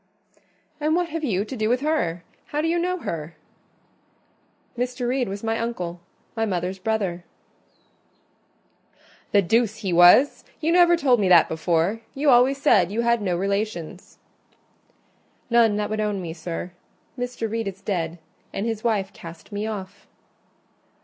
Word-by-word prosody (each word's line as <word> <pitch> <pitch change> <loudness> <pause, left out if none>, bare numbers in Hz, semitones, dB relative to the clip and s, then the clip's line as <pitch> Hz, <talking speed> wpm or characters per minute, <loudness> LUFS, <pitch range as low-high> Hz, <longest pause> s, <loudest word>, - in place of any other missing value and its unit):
"And 305 +2 +1
what 350 -1 0
have 325 0 -4
you 205 -7 0
to 265 - -7
do 215 -2 0
with 250 +2 +1
her? 275 - -1 0.2
How 295 - -3
do 315 - 0
you 340 +1 +1
know 365 +1 -1
her?" 160 0 -5 1.4
"Mr. 245 0 -2
Reed 250 -3 0
was 200 +2 -6
my 225 0 -1
uncle—my 185 0 -5
mother's 185 -2 -2
brother." 190 -4 -2 2.1
"The 200 -1 +4
deuce 220 +3 +1
he 185 - 0
was! 175 +11 +6 0.2
You 320 +1 0
never 345 0 +5
told 260 -7 +3
me 195 -3 +2
that 175 -3 +7
before: 170 +6 0
you 280 +1 +3
always 255 +3 +4
said 200 - +4
you 225 +3 0
had 235 -1 +2
no 180 -4 0
relations." 195 -3 -3 1.3
"None 230 -3 +4
that 210 0 -2
would 215 0 -1
own 210 -2 -1
me, 170 -3 -5
sir. 170 +2 -6 0.4
Mr. 245 -2 -3
Reed 225 0 -3
is 195 -1 -6
dead, 170 -4 -2 0.3
and 200 - -3
his 225 -2 -3
wife 210 -5 0
cast 170 -2 -12
me 205 +1 -3
off." 195 -4 -7
215 Hz, 150 wpm, -24 LUFS, 180-245 Hz, 2.1 s, that